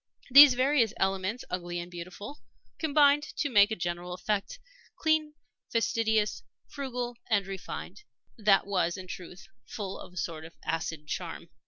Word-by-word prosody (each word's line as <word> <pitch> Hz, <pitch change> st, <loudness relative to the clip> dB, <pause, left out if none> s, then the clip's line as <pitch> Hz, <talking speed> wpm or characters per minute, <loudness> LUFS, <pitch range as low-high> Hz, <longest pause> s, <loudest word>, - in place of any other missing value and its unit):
These 280 Hz, -1 st, +10 dB
various 255 Hz, -3 st, +2 dB
elements, 195 Hz, +5 st, -1 dB
ugly 175 Hz, -1 st, -3 dB
and 175 Hz, +1 st, -7 dB
beautiful, 175 Hz, -, -8 dB, 0.4 s
combined 290 Hz, -1 st, +4 dB, 0.2 s
to 290 Hz, -, -1 dB
make 205 Hz, -2 st, +6 dB
a 220 Hz, -, -2 dB
general 175 Hz, 0 st, -4 dB
effect 205 Hz, -, -2 dB, 0.4 s
clean, 315 Hz, -1 st, +1 dB, 0.4 s
fastidious, 220 Hz, -, +1 dB, 0.3 s
frugal, 250 Hz, -3 st, -4 dB
and 205 Hz, -4 st, +2 dB
refined 195 Hz, -, -7 dB, 0.3 s
that 210 Hz, -4 st, +3 dB
was, 185 Hz, -3 st, 0 dB
in 185 Hz, -, -8 dB
truth, 180 Hz, 0 st, -9 dB, 0.2 s
full 195 Hz, -2 st, -5 dB
of 180 Hz, -, -11 dB
a -, -, -14 dB
sort 165 Hz, -2 st, -4 dB
of 165 Hz, +1 st, -12 dB
acid 160 Hz, -1 st, -3 dB
charm. -, -, -5 dB
200 Hz, 145 wpm, -29 LUFS, 180-245 Hz, 0.4 s, These